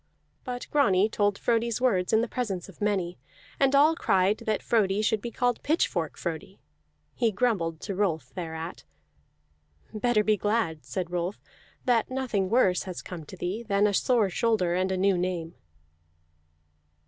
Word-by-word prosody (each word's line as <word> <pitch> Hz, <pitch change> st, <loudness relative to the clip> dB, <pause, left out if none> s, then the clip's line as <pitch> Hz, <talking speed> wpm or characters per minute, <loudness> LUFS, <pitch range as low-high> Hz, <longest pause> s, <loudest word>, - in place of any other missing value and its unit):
But 245 Hz, -1 st, -5 dB
Grani 205 Hz, -9 st, +4 dB
told 205 Hz, -2 st, +1 dB
Frodi's 235 Hz, -1 st, 0 dB
words 195 Hz, -8 st, +1 dB
in 220 Hz, 0 st, +4 dB
the 235 Hz, -, -1 dB
presence 205 Hz, -8 st, -3 dB
of 195 Hz, -1 st, -15 dB
many, 190 Hz, -7 st, -1 dB, 0.4 s
and 275 Hz, 0 st, +3 dB
all 300 Hz, +3 st, +5 dB
cried 195 Hz, -, +2 dB
that 215 Hz, -1 st, 0 dB
Frodi 210 Hz, -2 st, +2 dB
should 215 Hz, -1 st, +1 dB
be 235 Hz, -, -4 dB
called 245 Hz, 0 st, 0 dB
Pitchfork 315 Hz, +4 st, 0 dB
Frodi. -, -, -5 dB, 0.5 s
He 230 Hz, -3 st, +1 dB
grumbled 190 Hz, -8 st, 0 dB
to 200 Hz, -, -4 dB
Rolf 165 Hz, -9 st, -1 dB
thereat. 165 Hz, -1 st, -6 dB, 1.1 s
"Better 215 Hz, 0 st, +2 dB
be 215 Hz, 0 st, +2 dB
glad," 205 Hz, -7 st, -1 dB
said 180 Hz, -3 st, -4 dB
Rolf, 180 Hz, +3 st, -2 dB, 0.5 s
"that 240 Hz, -3 st, +2 dB
nothing 250 Hz, -8 st, -1 dB
worse 195 Hz, -6 st, +3 dB
has 180 Hz, -, -6 dB
come 170 Hz, -4 st, -8 dB
to 185 Hz, -, -11 dB
thee 185 Hz, +6 st, -3 dB
than 205 Hz, -3 st, +1 dB
a 205 Hz, -, +2 dB
sore 220 Hz, -2 st, +2 dB
shoulder 200 Hz, -4 st, +1 dB
and 185 Hz, +1 st, 0 dB
a 190 Hz, -, 0 dB
new 190 Hz, -1 st, +2 dB
name." 175 Hz, -2 st, -2 dB
205 Hz, 160 wpm, -27 LUFS, 180-235 Hz, 1.1 s, all